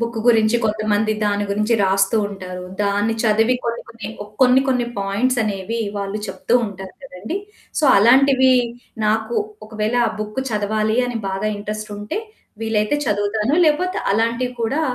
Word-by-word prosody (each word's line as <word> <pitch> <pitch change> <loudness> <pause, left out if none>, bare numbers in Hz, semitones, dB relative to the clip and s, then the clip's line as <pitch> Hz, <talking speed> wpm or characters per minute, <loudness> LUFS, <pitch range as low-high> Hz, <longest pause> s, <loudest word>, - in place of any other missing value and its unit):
Book 230 -1 -2
గురించి 225 -1 +4
కొంతమంది 215 0 +1
దాని 205 0 0
గురించి 210 +3 +1
రాస్తూ 195 +3 +2
ఉంటారు. 185 -2 -7 0.2
దాన్ని 205 +2 +1
చదివి 225 +2 +3
కొన్ని 235 0 -2
కొన్ని 220 -3 -8
ఓ - - -8 0.2
కొన్ని 255 +1 +6
కొన్ని 250 -2 +1
పాయింట్స్ 205 +6 0
అనేవి 215 +2 -3 0.2
వాళ్ళు 200 +1 -3
చెప్తూ 200 +4 -2
ఉంటారు 190 -2 -9
కదండీ! 220 - -6 0.4
సో, - - +1
అలాంటివి 260 +4 +5 0.5
నాకు 220 +2 0 0.3
ఒకవేళ 215 +2 -2
ఆ - - 0
బుక్ 215 +4 -3
చదవాలి 215 +1 0
అని 245 -2 -3
బాగా 195 +2 -2
ఇంట్రెస్టుంటే 210 - -5 0.4
వీలైతే 220 +3 +1
చదువుతాను. 210 +3 0
లేకపోతే 365 +6 +1
అలాంటివి 230 +4 0
కూడా 270 +7 0
215 Hz, 140 wpm, -20 LUFS, 205-235 Hz, 0.5 s, కొన్ని